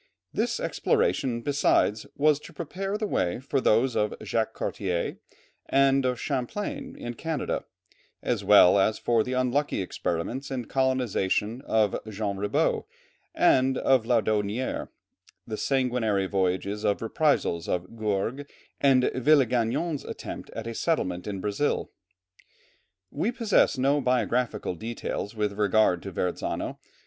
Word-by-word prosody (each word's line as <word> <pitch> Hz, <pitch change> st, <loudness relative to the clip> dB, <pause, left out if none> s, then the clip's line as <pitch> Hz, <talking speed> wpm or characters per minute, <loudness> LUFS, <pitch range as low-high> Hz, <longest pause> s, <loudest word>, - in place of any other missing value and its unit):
This -, -, 0 dB
exploration 435 Hz, -, 0 dB
besides, 115 Hz, -5 st, +2 dB
was 150 Hz, 0 st, +3 dB
to -, -, -13 dB
prepare 195 Hz, +5 st, -4 dB
the 215 Hz, -, -2 dB
way 90 Hz, -, 0 dB
for 135 Hz, +1 st, -1 dB
those 120 Hz, +3 st, +3 dB
of 105 Hz, 0 st, 0 dB
Jacques 110 Hz, -1 st, -1 dB
Cartier 90 Hz, -5 st, -2 dB, 0.5 s
and 135 Hz, 0 st, +4 dB
of 125 Hz, -1 st, 0 dB
Champlain 205 Hz, -, -3 dB
in 120 Hz, -, -5 dB
Canada, 160 Hz, +4 st, -3 dB, 0.6 s
as -, -, -1 dB
well 90 Hz, +3 st, +7 dB
as 105 Hz, +3 st, +2 dB
for 115 Hz, -2 st, +2 dB
the 125 Hz, -, -4 dB
unlucky 130 Hz, +3 st, 0 dB
experiments 95 Hz, +8 st, -3 dB
in 130 Hz, -3 st, -3 dB
colonization 125 Hz, -4 st, 0 dB
of 110 Hz, -3 st, +2 dB
Jean 100 Hz, -1 st, -3 dB
Ribaut, 100 Hz, +1 st, 0 dB, 0.5 s
and 130 Hz, 0 st, +4 dB
of 130 Hz, -4 st, +3 dB
Laudonnière, 110 Hz, 0 st, 0 dB, 0.6 s
the 110 Hz, -, -4 dB
sanguinary 120 Hz, -6 st, +1 dB
voyage 95 Hz, -1 st, 0 dB
of 105 Hz, 0 st, -1 dB
reprisals 115 Hz, -, +1 dB
of 90 Hz, +5 st, -3 dB
Gourgues, 110 Hz, +6 st, -2 dB, 0.3 s
and 135 Hz, -2 st, +4 dB
Villegagnon's 130 Hz, +2 st, +2 dB
attempt -, -, -7 dB
at 115 Hz, -, -5 dB
a 115 Hz, -, -4 dB
settlement 95 Hz, -, -1 dB
in 100 Hz, -2 st, -4 dB
Brazil. 105 Hz, +9 st, -1 dB, 1.2 s
We 195 Hz, +11 st, -1 dB
possess 225 Hz, -, +2 dB
no 140 Hz, +3 st, +2 dB
biographical 125 Hz, -4 st, 0 dB
details 110 Hz, +2 st, -5 dB
with 105 Hz, -1 st, -1 dB
regard 105 Hz, -3 st, +2 dB
to 95 Hz, -, -7 dB
Verrazzano. 90 Hz, -1 st, -3 dB
120 Hz, 125 wpm, -27 LUFS, 105-135 Hz, 1.2 s, well